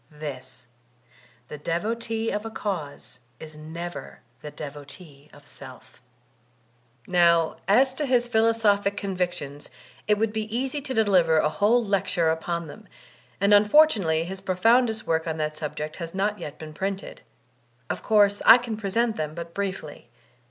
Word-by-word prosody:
This: 135 -5 -8 0.8
the 150 - -8
devotee 225 +7 -2
of 210 - -3
a 225 - -5
cause 160 - -5 0.2
is 155 -1 -11
never 165 +3 -8 0.2
the 150 - -7
devotee 145 0 -10
of 145 0 -18
self. 130 -3 -14 1.0
Now 170 -2 +3
as 255 +7 +4
to 290 +2 -3
his 245 -2 +2
philosophic 220 -3 +2
convictions, 175 -8 -4 0.4
it 210 -1 +3
would 215 0 0
be 220 -1 -2
easy 270 +3 -2
to 265 -2 -5
deliver 185 -7 +3
a 150 - +3
whole 220 +7 +2
lecture 190 -5 +1
upon 170 +1 -3
them; 210 +8 -12 0.5
and 200 +1 +3
unfor* 210 +10 +7
tunately 165 - -1
his 190 +2 -7
profoundest 220 +4 +2
work 160 0 0
on 160 -1 -2
that 155 0 -2
subject 155 0 -5
has 165 0 -6
not 205 +2 -1
yet 150 0 -7
been 155 -1 -9
printed. 195 +4 -5 0.7
Of - - -4
course, 205 -2 +3
I 230 - +9
can 240 -3 -5
present 220 +2 -1
them 155 0 -4
but 170 0 -7
briefly. 190 -10 -5
190 Hz, 150 wpm, -25 LUFS, 155-220 Hz, 1.0 s, I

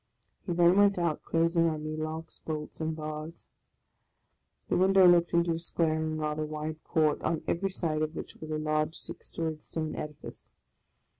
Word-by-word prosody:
He 175 - 0
then 175 +2 +5
went 200 -1 +5
out, 170 -3 0
closing 165 0 +2
on 155 -1 -4
me 155 0 -3
locks, 155 +1 -5
bolts, 155 0 -5
and 160 0 -1
bars. 155 +1 -6 1.2
The - - +1
window 190 0 +6
looked 175 -1 +5
into 170 0 +3
a 165 - -1
square 165 -1 +1
and 155 0 -2
rather 155 0 -1
wide 155 +1 -5
court, 155 -2 +2
on 165 - -1
every 195 +3 0
side 160 -5 -1
of 155 +1 -1
which - - -7
was 155 - -8
a 155 - -1
large 155 +1 0
six - - -8
storied 160 -2 -3
stone 155 -1 -4
edifice. 150 -1 -7
160 Hz, 175 wpm, -30 LUFS, 155-170 Hz, 1.2 s, window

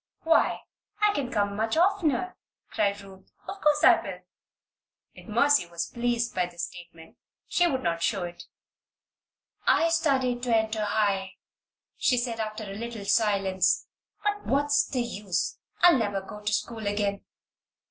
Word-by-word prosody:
"Why, 325 - +3 0.4
I 420 -1 +3
can 275 -7 -2
come 205 -5 0
much 220 +7 -1
oftener," 365 -3 +1 0.4
cried 200 -1 0
Ruth. 190 -1 -15 0.2
"Of 390 +1 -7
course 300 0 +3
I 360 -3 +7
will." 190 -2 -7 0.9
If - - -15
Mercy 235 -2 +3
was 170 -1 -5
pleased 235 0 -1
by 180 -1 0
this 175 -1 -5
statement, 170 -2 -13 0.3
she 350 - +3
would 265 -6 -1
not 170 -1 -1
show 195 0 0
it. 175 0 -8 1.2
"I 330 - +4
studied 270 -7 +1
to 240 -2 +2
enter 220 -1 -1
High," 200 -2 0 0.6
she 250 - +2
said, 240 -2 -2
after 215 0 -4
a 195 -2 -7
little 225 -1 -6
silence. 195 -3 +2 0.4
"But 415 0 -1
what's 290 +1 +2
the 250 -3 -1
use? 205 -5 -3 0.2
I'll 350 -6 +7
never 205 -3 -1
go 200 +2 -10
to 210 0 -2
school 215 +1 -2
again. 205 -1 -1
220 Hz, 150 wpm, -27 LUFS, 200-275 Hz, 1.2 s, I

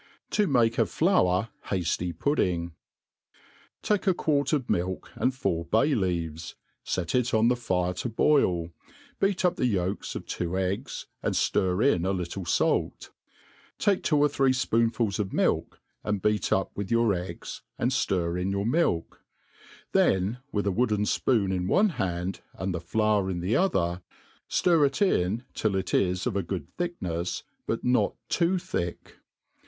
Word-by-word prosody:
To 210 -2 +2
make 120 -5 +2
a - - +3
Flour 110 - +2 0.2
Hqfty 90 -2 -1
Pudding. 85 - 0 1.1
TAKE 210 -1 0
a 185 - +4
quart 145 -4 +1
of 145 -6 0
milk, 90 +2 -2
and 130 - +1
four 85 -11 -2
bay 115 - +2
leaves; 85 - -2 0.3
fet 85 -2 -2
it 125 -2 +1
on 110 +2 +4
the 125 - +3
fire 90 -7 -1
to 90 +7 -4
boil, 90 - +2 0.5
beat 195 -1 +1
up 180 - +2
the 125 - +2
yolks 95 -3 -2
of - - -5
two 90 +1 -3
eggs, 95 +1 -2 0.2
and - - -1
ftir 95 +3 +1
ia 140 - +4
a 95 +3 0
little 90 +1 -4
fait. - - 0 0.7
Take 200 -3 +2
two 150 - +2
or 145 0 +5
three 135 -2 +2
fpoonfuls 115 -4 +1
of 100 -2 -2
milk, - - 0 0.2
and 105 -1 -1
beat 105 +2 0
up 95 - 0
with 100 -1 -4
your 115 -2 +3
eggs, 90 0 -6 0.2
and 125 - 0
ftir 90 -8 0
in 95 - -1
your 100 +1 -1
milk; 120 - 0 0.7
then, 95 +6 +2
with 105 -1 -1
a 100 - +2
wooden 105 0 +1
fpoon 105 -2 +1
in 90 -1 -1
one 205 - +4
hand, 95 - -3
and 95 0 -3
the 85 - -3
flour 105 +2 +1
in 90 -2 -2
the 95 +6 0
other, 90 - +1 0.5
ftir 170 -4 +3
it 140 -1 +1
in 115 - +1
till 105 -3 0
it 95 -1 -2
is 90 -1 +1
of 120 - -1
a 100 - +1
good 95 +1 -6
tbicknefs, 90 - -3 0.2
but 115 - -2
not 125 0 +2 0.2
too^ 180 +1 +2
thick. 130 - -5
100 Hz, 165 wpm, -27 LUFS, 90-130 Hz, 1.1 s, or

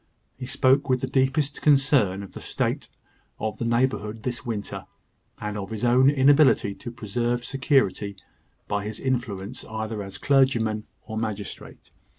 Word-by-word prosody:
He 125 -1 -7
spoke 135 +2 +3
with 130 -1 +2
the - - 0
deepest 135 +2 +1
concern 135 -10 +3
of 100 - -10
the - - -9
state - - -2 0.5
of 110 0 -3
the 115 - -1
neighbourhood 115 -3 0
this 125 0 -3
winter, 110 -4 -5 0.5
and 105 0 -4
of 95 -1 -6
his 110 +1 -3
own 125 +3 +5
inability 140 -6 +4
to 120 - -8
preserve 120 +2 -2
security, 130 -7 +1 0.5
by 105 -1 -1
his 105 +1 -5
influence 120 -4 -3
either 110 -1 -4
as 100 -1 -7
clergyman 120 -6 +2 0.2
or 110 -1 -4
magistrate. 105 -3 -6
120 Hz, 150 wpm, -25 LUFS, 105-130 Hz, 0.5 s, own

